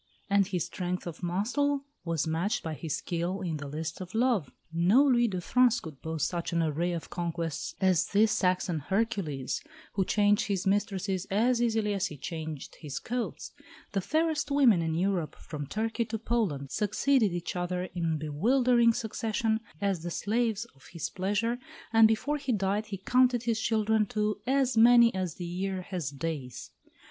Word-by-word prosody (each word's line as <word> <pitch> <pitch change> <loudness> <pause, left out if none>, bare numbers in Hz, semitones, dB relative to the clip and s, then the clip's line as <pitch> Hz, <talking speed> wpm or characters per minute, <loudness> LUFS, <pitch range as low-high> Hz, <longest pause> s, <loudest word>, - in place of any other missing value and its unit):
And 200 -1 +4
his 180 -5 -1
strength 180 0 -4
of 170 0 -7
muscle 250 +11 0 0.2
was 165 -3 -1
matched 165 +6 -1
by 160 - -3
his 155 -1 -3
skill 175 +3 -3
in 165 -4 -2
the 140 -1 -6
lists 160 +4 -5
of 185 +3 -8
love. 225 - +2 0.2
No 185 +11 +5
Louis 240 -4 +4
of 180 - -3
France 250 +2 +4
could 155 -5 -10
boast 160 -2 -1
such 170 -1 -3
an 170 -1 +1
array 165 +3 0
of 170 - -6
conquests 170 -3 -3
as 185 -4 +3
this 215 +2 +3
Saxon 180 -5 +1
Hercules, 190 - -1 0.3
who 195 - +1
changed 205 +3 +2
his 195 -2 -1
mistresses 195 -2 0
as 235 +5 +2
easily 220 -3 +1
as 195 0 0
he 150 - -9
changed 160 -1 -6
his 145 -4 -6
coats; 245 0 -4 0.4
the 195 - 0
fairest 315 - 0
women 260 -10 +5
in 160 -1 -1
Europe, 180 -2 0
from 145 -2 -7
Turkey 225 - -1
to 225 +1 -3
Poland, 200 - -1
succeeded 220 +1 +2
each 175 +1 -4
other 180 0 -2
in 165 -3 0
bewildering 235 - +3
succession 220 0 -1 0.2
as 195 -4 0
the 175 - -4
slaves 225 +4 0
of 135 - -23
his 170 - -4
pleasure, 210 +6 -1 0.3
and 225 0 +8
before 255 +7 0
he 275 -3 -2
died 205 0 0
he 200 -2 -5
counted 250 +4 +3
his 225 -2 0
children 220 -1 +2
to 210 -2 -1
as 265 -1 +2
many 235 +1 +7
as 185 -4 -2
the 175 - -6
year 185 +2 -3
has 175 -7 -3
days. 140 -4 -5
195 Hz, 175 wpm, -29 LUFS, 170-225 Hz, 0.4 s, and